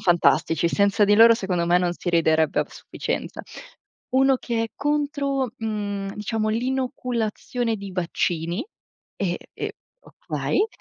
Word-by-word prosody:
fantastici, 170 Hz, -1 st, +3 dB
senza 200 Hz, +2 st, +3 dB
di 205 Hz, +1 st, +4 dB
loro 230 Hz, +2 st, +8 dB
secondo 185 Hz, -6 st, -1 dB
me 175 Hz, +1 st, +4 dB
non 180 Hz, -1 st, 0 dB
si 175 Hz, -, -3 dB
riderebbe 160 Hz, -2 st, +3 dB
a -, -, -2 dB
sufficienza. -, -, -5 dB, 0.7 s
Uno 270 Hz, +1 st, +4 dB
che 235 Hz, -2 st, -2 dB
è -, -, -2 dB
contro, 280 Hz, -3 st, -1 dB
uhm, 205 Hz, -3 st, -3 dB
diciamo 215 Hz, +1 st, -2 dB
l'inoculazione 245 Hz, -1 st, -1 dB
di 200 Hz, -1 st, -7 dB
vaccini 175 Hz, -, -1 dB, 0.5 s
e 180 Hz, -3 st, -1 dB, 0.2 s
e -, -, -4 dB, 0.3 s
okay. 425 Hz, -, -2 dB
210 Hz, 130 wpm, -24 LUFS, 180-250 Hz, 0.7 s, loro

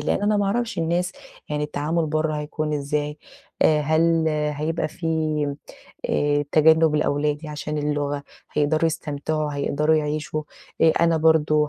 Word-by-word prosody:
لإن -, -, 0 dB
أنا 210 Hz, 0 st, +2 dB
ما 205 Hz, -, +1 dB
أعرفش 225 Hz, -1 st, -1 dB
الناس 175 Hz, +2 st, 0 dB, 0.4 s
يعني 150 Hz, 0 st, -1 dB
التعامل 155 Hz, +3 st, -1 dB
برّه 155 Hz, 0 st, 0 dB
هيكون 150 Hz, 0 st, -3 dB
إزاي؟ 150 Hz, +1 st, -2 dB, 0.4 s
آآ 155 Hz, -1 st, +4 dB
هل 160 Hz, +2 st, +2 dB
هيبقى 150 Hz, +1 st, -1 dB
في 165 Hz, +2 st, -7 dB, 1.0 s
آآ 145 Hz, 0 st, +1 dB
تجنُّب 160 Hz, 0 st, +5 dB
لأولادي 150 Hz, +1 st, 0 dB
عشان 150 Hz, 0 st, -4 dB
اللغة، 145 Hz, -1 st, -1 dB, 0.3 s
هيقدروا 150 Hz, +2 st, +1 dB
يستمتعوا، 155 Hz, -1 st, -2 dB
هيقدروا 150 Hz, +2 st, +1 dB
يعيشوا، 155 Hz, 0 st, -2 dB, 0.4 s
آآ 160 Hz, -1 st, +6 dB
أنا 170 Hz, -1 st, +4 dB
برضه 155 Hz, -1 st, +3 dB
155 Hz, 135 wpm, -23 LUFS, 150-160 Hz, 1.0 s, آآ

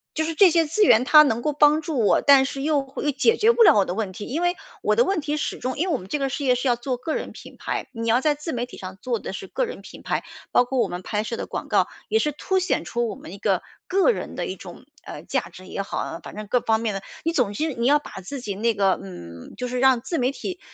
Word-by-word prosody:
就 315 Hz, -, +1 dB
是 325 Hz, -, -2 dB
这 375 Hz, +3 st, +7 dB
些 330 Hz, 0 st, +3 dB
资 415 Hz, +8 st, +2 dB
源 235 Hz, -, +6 dB
它 305 Hz, +3 st, +8 dB
能 235 Hz, -5 st, 0 dB
够 300 Hz, -, 0 dB
帮 295 Hz, +2 st, +4 dB
助 310 Hz, -6 st, -3 dB
我， -, -, +4 dB
但 275 Hz, -2 st, +6 dB
是 275 Hz, 0 st, -5 dB
又 295 Hz, -2 st, +2 dB
会 270 Hz, +2 st, -7 dB
又 295 Hz, -, +2 dB
解 285 Hz, -, +3 dB
决 450 Hz, +2 st, +5 dB
不 470 Hz, -, +1 dB
了 410 Hz, -, +7 dB
我 200 Hz, -, +5 dB
的 175 Hz, -, -3 dB
问 210 Hz, -3 st, -2 dB
题。 205 Hz, +3 st, -8 dB
因 300 Hz, +7 st, -3 dB
为 350 Hz, +1 st, +2 dB, 0.3 s
我 -, -, +2 dB
的 480 Hz, -, +5 dB
问 390 Hz, -4 st, 0 dB
题 295 Hz, +1 st, -2 dB
始 -, -, -3 dB
终 255 Hz, +1 st, -3 dB
因 355 Hz, +5 st, 0 dB
为 345 Hz, -, 0 dB
我 -, -, +1 dB
们 185 Hz, -, -11 dB
这 295 Hz, -, -1 dB
个 275 Hz, -1 st, 0 dB
事 280 Hz, +2 st, -4 dB
业 255 Hz, -, +4 dB
是 250 Hz, +2 st, -2 dB
要 245 Hz, -, +3 dB
做 250 Hz, +1 st, -3 dB
个 310 Hz, +6 st, -3 dB
人 -, -, -4 dB
品 -, -, -12 dB
牌， -, -, -4 dB
你 230 Hz, 0 st, -4 dB
要 235 Hz, +3 st, +3 dB
在 300 Hz, 0 st, +2 dB
自 300 Hz, +3 st, -6 dB
媒 240 Hz, 0 st, -2 dB
体 -, -, -12 dB
上 185 Hz, 0 st, -8 dB
做 245 Hz, -2 st, -1 dB
的 190 Hz, -, -6 dB
是 190 Hz, -, -7 dB
个 -, -, -1 dB
人 475 Hz, -, -8 dB
品 -, -, -12 dB
牌， -, -, -1 dB, 0.3 s
包 245 Hz, -, +4 dB
括 265 Hz, +1 st, -3 dB
我 -, -, +3 dB
们 175 Hz, +1 st, -6 dB
拍 210 Hz, +2 st, -2 dB
摄 225 Hz, +2 st, -4 dB
的 -, -, -5 dB
广 -, -, -5 dB
告， -, -, +2 dB, 0.2 s
也 440 Hz, -, +3 dB
是 300 Hz, -7 st, 0 dB
凸 375 Hz, +6 st, -1 dB
显 370 Hz, -, 0 dB
出 240 Hz, 0 st, -1 dB
我 -, -, -5 dB
们 175 Hz, -, -11 dB
一 -, -, -8 dB
个 -, -, +1 dB, 0.3 s
个 390 Hz, +6 st, +3 dB
人 -, -, -5 dB
的 -, -, -3 dB
一 -, -, -4 dB
种， -, -, -12 dB, 0.2 s
呃， -, -, -9 dB
价 -, -, -2 dB
值 185 Hz, -, -13 dB
也 195 Hz, -, -4 dB
好， 170 Hz, -3 st, -4 dB
反 -, -, -10 dB
正 215 Hz, 0 st, -6 dB
各 245 Hz, +4 st, +1 dB
方 220 Hz, -1 st, +1 dB
面 220 Hz, -2 st, -1 dB
的。 195 Hz, -, -4 dB, 0.2 s
你 330 Hz, +1 st, 0 dB
总 250 Hz, -9 st, +1 dB
之 310 Hz, +8 st, -2 dB
你 235 Hz, 0 st, -1 dB
要 290 Hz, -, +6 dB
把 -, -, -12 dB
自 275 Hz, +9 st, -6 dB
己 215 Hz, -5 st, -4 dB
那 225 Hz, +3 st, 0 dB
个， 195 Hz, -2 st, +2 dB
嗯， 85 Hz, -3 st, -10 dB
就 250 Hz, -, -3 dB
是 250 Hz, 0 st, -3 dB
让 260 Hz, -1 st, +5 dB
自 265 Hz, +7 st, -3 dB
媒 250 Hz, 0 st, +2 dB
体 360 Hz, +5 st, -6 dB
260 Hz, 325 characters per minute, -23 LUFS, 220-310 Hz, 0.3 s, 它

